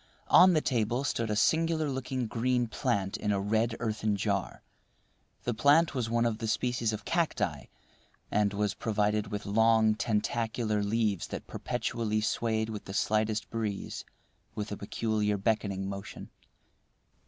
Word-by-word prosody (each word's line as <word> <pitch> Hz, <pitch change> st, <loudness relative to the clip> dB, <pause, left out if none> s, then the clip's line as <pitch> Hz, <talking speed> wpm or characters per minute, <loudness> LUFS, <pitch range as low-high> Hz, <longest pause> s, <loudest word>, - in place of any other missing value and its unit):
On 185 Hz, 0 st, +8 dB
the 155 Hz, -, +3 dB
table 120 Hz, 0 st, 0 dB
stood 115 Hz, -5 st, -1 dB
a 105 Hz, -, 0 dB
singular 160 Hz, +6 st, +2 dB
looking 130 Hz, -2 st, -2 dB
green 120 Hz, +2 st, 0 dB
plant 110 Hz, -5 st, -1 dB
in 105 Hz, -, -1 dB
a 100 Hz, -, +1 dB
red 110 Hz, +3 st, +1 dB
earthen 110 Hz, -2 st, -1 dB
jar. 100 Hz, -1 st, -2 dB, 0.8 s
The 120 Hz, -, -1 dB
plant 145 Hz, +7 st, +4 dB
was 125 Hz, -4 st, -2 dB
one 120 Hz, 0 st, +2 dB
of 115 Hz, -2 st, -1 dB
the 115 Hz, -, -3 dB
species 120 Hz, 0 st, 0 dB
of 110 Hz, -, -6 dB
cacti, 170 Hz, -1 st, -1 dB, 0.7 s
and 105 Hz, -1 st, +2 dB
was 105 Hz, 0 st, 0 dB
provided 105 Hz, -1 st, 0 dB
with 105 Hz, 0 st, -5 dB
long, 110 Hz, +1 st, +4 dB
tentacular 110 Hz, 0 st, -1 dB
leaves 105 Hz, -2 st, 0 dB
that -, -, -6 dB
perpetually 110 Hz, -2 st, -2 dB
swayed 110 Hz, 0 st, 0 dB
with 105 Hz, -2 st, -6 dB
the 95 Hz, -, -7 dB
slightest 110 Hz, 0 st, 0 dB
breeze 110 Hz, -4 st, -3 dB, 0.5 s
with 105 Hz, 0 st, -4 dB
a -, -, -2 dB
peculiar 105 Hz, 0 st, -1 dB
beckoning 100 Hz, -2 st, -1 dB
motion. 100 Hz, 0 st, -7 dB
110 Hz, 145 wpm, -30 LUFS, 105-120 Hz, 0.8 s, On